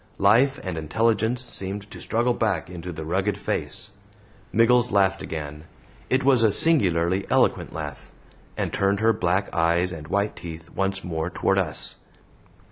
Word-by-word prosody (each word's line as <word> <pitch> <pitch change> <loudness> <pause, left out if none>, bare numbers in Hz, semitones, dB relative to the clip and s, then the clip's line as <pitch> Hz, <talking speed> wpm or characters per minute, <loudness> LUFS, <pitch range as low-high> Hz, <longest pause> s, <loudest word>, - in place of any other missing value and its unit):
Life 120 +8 +4
and 90 -4 -3
intelligence 115 +8 0
seemed 100 +2 -5
to - - -9
struggle 120 +2 +1
back 95 -8 -1
into 90 0 -6
the 80 -2 -7
rugged 95 +4 0
face. 105 +1 -3 0.6
Miggles 120 +2 +4
laughed 95 -2 +2
again 75 -1 -6 0.4
it 130 +1 +2
was 130 -3 +4
a 110 -2 +4
singularly 95 - +3
eloquent - - +2
laugh - - -7 0.5
and - - -2
turned 100 0 +1
her 110 +1 +4
black 95 0 0
eyes 85 +2 +2
and 75 -3 -8
white 100 +4 0
teeth 80 0 -9
once 95 0 -2
more 80 -1 -3
toward 95 +2 +1
us. 85 -6 -3
95 Hz, 150 wpm, -24 LUFS, 85-110 Hz, 0.6 s, Life